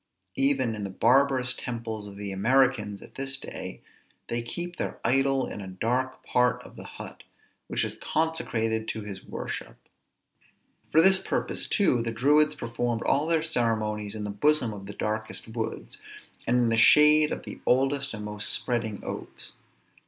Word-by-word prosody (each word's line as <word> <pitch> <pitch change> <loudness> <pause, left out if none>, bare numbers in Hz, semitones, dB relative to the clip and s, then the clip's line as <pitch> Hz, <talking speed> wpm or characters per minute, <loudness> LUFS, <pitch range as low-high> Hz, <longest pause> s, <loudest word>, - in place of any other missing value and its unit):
Even 270 - +2
in 105 -1 -5
the 100 - -3
barbarous 130 +5 +3
temples 115 -4 -5
of 100 0 -10
the 100 -1 -5
Americans 105 -1 +2
at - - -14
this 135 0 -3
day, - - -8 0.5
they 120 0 -1
keep 175 +9 -6
their - - -4
idol 135 +2 +3
in 105 - -6
a 95 - -7
dark 120 +8 -2
part 125 0 +2
of - - -14
the - - -9
hut, - - -8 0.5
which - - 0
is - - -7
consecrated 115 -9 -1
to 110 - -3
his 100 -2 -7
worship. - - -6 1.1
For 160 - +6
this 190 +1 +7
purpose - - -2
too 165 - +2
the 115 0 -1
Druids 150 +6 +3
performed 120 -3 -2
all 145 +3 +2
their 165 -1 +2
ceremonies 110 -7 0
in 105 - -4
the 105 - -3
bosom 125 +2 +2
of 100 -1 -9
the 105 - -7
darkest 110 +2 -3
woods, 110 0 -5 0.5
and 125 - +3
in 120 -1 +3
the 115 - +2
shade 150 +5 +7
of - - -4
the - - -8
oldest 135 0 +2
and 105 -1 -6
most 105 0 -2
spreading 115 -4 -1
oaks. - - -7
120 Hz, 165 wpm, -27 LUFS, 110-135 Hz, 1.1 s, this